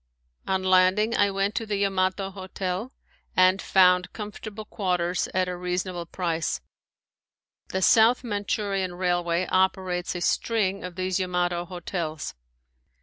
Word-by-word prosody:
On 190 0 0
landing 185 +4 +4
I 205 - +3
went 195 +1 0
to 225 - -2
the 210 - -1
Yamato 195 0 0
hotel 190 +3 -4 0.5
and 185 +1 +5
found 180 -1 +4
comfortable 215 0 -7
quarters 180 -4 -1
at 185 -1 +1
a 180 - -3
reasonable 180 -1 -3
price. 170 -2 -2 1.1
The 190 0 -2
South 230 +5 +5
Manchurian 205 -4 -2
railway 175 -1 0
operates 185 -1 0
a 175 - -4
string 200 -1 0
of 180 -1 -6
these 185 0 -1
Yamato 180 -1 0
hotels. 170 -3 -4
185 Hz, 125 wpm, -26 LUFS, 180-195 Hz, 1.1 s, and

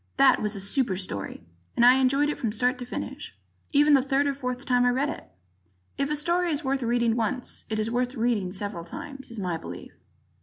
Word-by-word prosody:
That 270 -2 +5
was 210 0 -1
a - - -5
super 200 0 +1
story 100 - -5 0.3
and 235 - +5
I 250 +2 +8
enjoyed 275 +2 +3
it 295 - -3
from 225 - -1
start 250 +4 +1
to 245 - -6
finish, - - -6 0.3
even 295 0 +5
the 275 - +6
third 275 +2 +1
or 280 - +1
fourth 250 -2 -4
time 245 -1 +3
I 245 - +4
read 265 +4 +1
it. - - -7 0.7
If 275 0 -1
a 300 - 0
story 345 +3 +1
is 295 -1 -1
worth 270 0 0
reading 235 -1 +1
once 240 +2 -2
it 220 - -1
is 215 +1 -1
worth 250 +2 -1
reading 225 -6 0
several 200 -2 -4
times, 270 +9 -8
is 230 -2 -6
my 180 -4 -1
belief. 160 - -9
250 Hz, 220 wpm, -26 LUFS, 220-275 Hz, 0.7 s, I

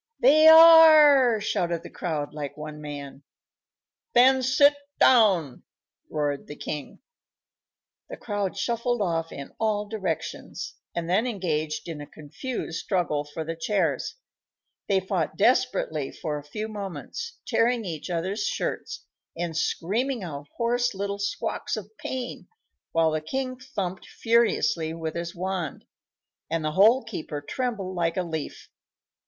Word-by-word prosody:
"They 310 +5 +6
are!" 310 -7 +8
shouted 175 -5 -1
the - - -10
crowd, 150 -4 -3
like 150 -1 -6
one 150 0 -8
man. 145 -2 -8 0.9
"Then 260 +2 +6
sit 260 +3 +5 0.3
down!" 190 - +4 0.5
roared 145 -2 -2
the 150 - -8
king. 150 -1 -6 1.1
The - - -7
crowd 205 -3 -3
shuffled 235 +3 0
off 165 -3 -2
in 140 - -8
all 215 -2 0
directions, 190 -7 -4 0.2
and 170 -1 -2
then 200 +8 +2
engaged 160 -9 -2
in 160 -3 -6
a 145 - -8
confused 165 - -6
struggle 165 -6 -1
for 145 +2 -6
the 165 +1 -4
chairs. 165 - -1 0.7
They 195 -1 +3
fought 185 -4 -2
desperately 195 - +1
for 150 -2 -4
a - - -12
few 210 +9 -5
moments, 210 - -6
tearing 235 -1 +1
each 160 -3 -5
others' 185 - -2
shirts, - - -4 0.3
and 170 -1 -3
screaming 220 - -1
out 145 -4 -7
hoarse 240 -1 0
little 200 +1 -3
squawks 200 +2 -3
of 215 +1 -9
pain, 255 -1 -5 0.4
while 165 -1 +2
the 155 0 -1
king 255 +9 -3
thumped 195 -8 -5
furiously 225 -8 +1
with 160 -1 -4
his 170 0 -5
wand, 180 -4 -4 0.6
and 165 -2 -1
the 155 - 0
Hole 220 +10 +5
keeper 170 -9 -5
trembled 195 - -3
like 165 -1 0
a 185 - +1
leaf. 160 -3 -6
185 Hz, 135 wpm, -26 LUFS, 160-235 Hz, 1.1 s, are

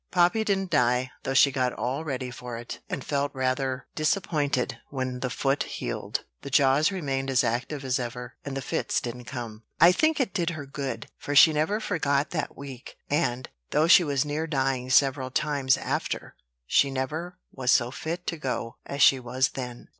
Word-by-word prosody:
Poppy 180 +4 +3
didn't 195 -3 0
die, 125 +1 +2
though 135 - -3
she 140 +1 +6
got 130 -2 0
all 130 +5 -2
ready 130 -4 -4
for 120 -1 -7
it; 120 0 -7
and 135 - -3
felt 145 0 0
rather 130 0 -1
disappointed 145 - 0
when 130 -2 -3
the 130 - -2
foot 135 +2 0
healed, - - -3 0.2
the - - -7
jaws 140 +5 +4
remained 135 -7 -2
as 130 -2 +3
active 130 +4 -2
as 130 0 +1
ever, 125 0 -5
and 140 -1 -5
the 135 - -4
fits - - 0
didn't 125 0 -6
come. 120 -5 -6 0.2
I 170 - +8
think 315 - +2
it 255 -7 0
did 175 -4 0
her 145 - -6
good; 140 -1 -5
for 145 - -3
she 155 +3 +8
never 155 +8 +1
forgot 150 -8 0
that 155 -4 -3
week, 135 -3 -9
and, 130 -5 0 0.2
though 155 +2 +3
she 175 +1 +8
was 145 -2 0
near 150 +2 -2
dying 135 -4 -1
several 135 0 +3
times 140 -2 +1
after, - - -3 0.3
she 140 - +3
never 155 +7 -4
was 130 -2 -3
so 120 +1 +3
fit 165 +5 -5
to 165 - -2
go 125 -5 -4
as 140 0 +1
she 135 - +6
was 130 +1 0
then. 125 -3 -7
135 Hz, 185 wpm, -27 LUFS, 130-155 Hz, 0.3 s, I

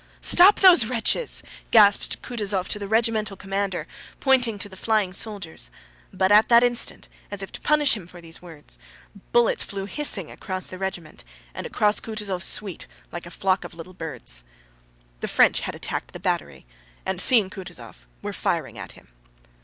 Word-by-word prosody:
"Stop 375 +4 +7
those 360 - +7
wretches!" 250 - -1 0.3
gasped 205 -3 +4
Kutúzov 205 -6 -1
to 210 - -1
the 200 - -5
regimental 220 -2 0
commander, 195 -1 -3 0.3
pointing 250 -5 +2
to 200 - -4
the 190 - -13
flying 210 -2 0
soldiers; 195 -5 -3 0.4
but 190 +1 +1
at 210 +1 +6
that 235 0 +7
instant, 240 -1 +1 0.2
as 205 -1 -6
if 195 - -8
to - - -10
punish 295 -4 +4
him 190 -6 -9
for 180 0 -13
those 165 -1 -7
words, 165 -4 -11 0.5
bullets 240 -1 +2
flew 195 -1 -5
hissing 205 - -2
across 185 -2 -6
the 185 - -10
regiment 180 -5 -6 0.3
and - - -6
across 210 0 +1
Kutúzov's 210 -5 -4
suite 200 -5 -2 0.2
like 170 0 -7
a - - -9
flock 185 +2 0
of 175 - -10
little 170 +2 -10
birds. 150 - -4 0.8
The - - -4
French - - +4
had - - -5
attacked - - -4
the - - -8
battery - - -3 0.4
and, 190 -1 -1
seeing 215 -6 +4
Kutúzov, 185 - -10 0.2
were - - -4
firing - - -2
at - - -8
him. - - -19
200 Hz, 170 wpm, -24 LUFS, 185-225 Hz, 0.8 s, Stop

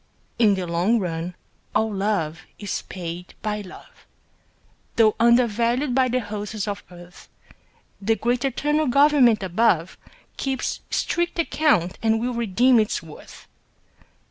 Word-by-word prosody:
In 210 -4 +5
the 185 -1 -3
long 175 +7 +1
run 175 -2 -3 0.4
all 220 0 +1
love 195 -6 -1 0.2
is 205 - -4
paid 175 -1 -8
by 210 -1 -2
love, 185 -2 -14 0.9
Though 220 -2 +4
undervalued 235 +2 +2
by 260 0 +3
the 250 +1 0
hosts 210 0 -5
of 200 -1 -4
earth; 175 0 -14 0.7
The 225 +3 +2
great 240 +2 -1
eternal 295 +3 0
Government 260 -5 +4
above 185 -2 +1 0.4
Keeps 265 -2 -2
strict 345 0 -1
account 300 - +1
and 225 0 +2
will 245 +2 -2
redeem 235 +2 +3
its 215 -5 -1
worth. 155 -2 -13
220 Hz, 125 wpm, -23 LUFS, 185-245 Hz, 0.9 s, In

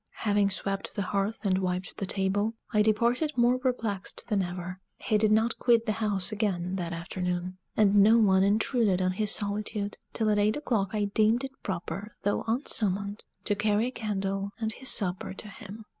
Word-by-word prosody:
Having 205 -2 +2
swept 195 0 -3
the 200 - -1
hearth 200 +4 -2
and 190 -1 +2
wiped 180 0 -3
the 195 - -3
table, 205 +3 +1 0.2
I 210 - +4
departed 235 +8 +2
more 245 +1 +4
perplexed 230 -5 -3
than 205 -3 +2
ever. 180 0 -5 0.2
He 215 - +1
did 215 0 +3
not 220 +2 +2
quit 235 -2 +3
the 215 - +1
house 205 -3 +1
again 190 -4 -1
that 170 -2 -3
afternoon, 180 +1 -3 0.2
and 205 -2 +4
no 215 +3 +7
one 190 -4 +4
intruded 210 0 +2
on 185 0 +1
his 210 +3 -1
solitude 205 0 -2
till 220 -2 +1
at 210 - +2
eight 210 +4 +2
o'clock 225 -10 0
I 210 -1 +1
deemed 215 +4 +2
it 270 - -4
proper, 190 +2 -5
though 205 - 0
unsummoned, 205 -4 -1 0.2
to 205 - +1
carry 210 +1 +1
a - - -9
candle 195 -3 -2
and 220 -1 -1
his 260 +2 -3
supper 190 -1 +1
to 210 - -7
him. 210 +1 -10
205 Hz, 185 wpm, -28 LUFS, 190-220 Hz, 0.2 s, no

